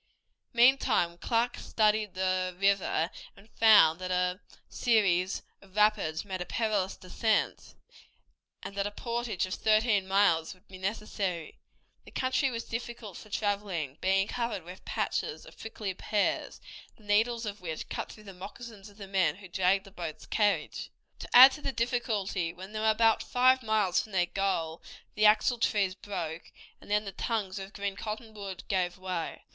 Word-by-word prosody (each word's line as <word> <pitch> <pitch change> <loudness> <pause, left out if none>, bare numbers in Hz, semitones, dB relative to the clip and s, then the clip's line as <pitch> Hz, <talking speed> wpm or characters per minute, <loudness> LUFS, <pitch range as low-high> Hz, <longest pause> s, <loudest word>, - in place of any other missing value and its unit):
Meantime 235 -8 +4
Clark 235 +3 0
studied 215 -2 +1
the 185 -1 0
river 195 -4 +2 0.3
and 205 +3 -18
found 205 -7 +6
that 185 0 -5
a 180 0 0 0.3
series 195 -6 +1 0.2
of 195 -1 -19
rapids 210 -6 +2
made 190 -2 -5
a - - -3
perilous 210 -4 -1
descent, 215 +4 -1 0.9
and - - -6
that 200 0 -1
a - - -3
portage 235 -2 -2
of 185 - -5
thirteen 215 -2 +2
miles 190 -4 +2
would 185 +3 -28
be 190 -1 -11
necessary. 195 -4 -3 0.4
The - - -14
country 260 +1 0
was 230 -2 -4
difficult 230 -4 -6
for 215 - -11
traveling, 200 -9 -2
being 195 +1 +2
covered 235 -6 -3
with 180 +3 -11
patches - - -2
of - - -14
prickly 215 -3 -5
pears, 205 +2 -1 0.4
the 220 - -21
needles 225 +3 +1
of 205 -1 -6
which 160 -3 -5
cut - - -5
through 215 - -13
the 195 -2 -10
moccasins 205 +2 -10
of 205 - -19
the 200 - -8
men 185 -6 +2
who 195 0 -12
dragged 190 +2 +2
the 195 - -13
boat's 170 -5 -7
carriage. 205 -2 0 0.3
To - - -8
add 260 +2 +11
to 300 - -8
the 275 - -2
difficulty, 225 -7 -1
when 190 +3 -10
they 215 - -4
were 220 0 +2
about 225 +1 +4
five 255 +1 +3
miles 215 -5 +2
from 215 - -12
their 180 -2 +3
goal 175 -4 -2 0.3
the 215 0 +5
axle 230 +3 +3
trees 200 -4 +1
broke, 175 -4 -6 0.3
and - - -15
then 210 +1 +1
the 195 - -5
tongues 200 -2 -2
of 195 0 -8
green 200 -1 -3
cottonwood 210 -3 -6
gave 180 -2 0
way. 185 -3 -5
200 Hz, 165 wpm, -29 LUFS, 185-220 Hz, 0.9 s, add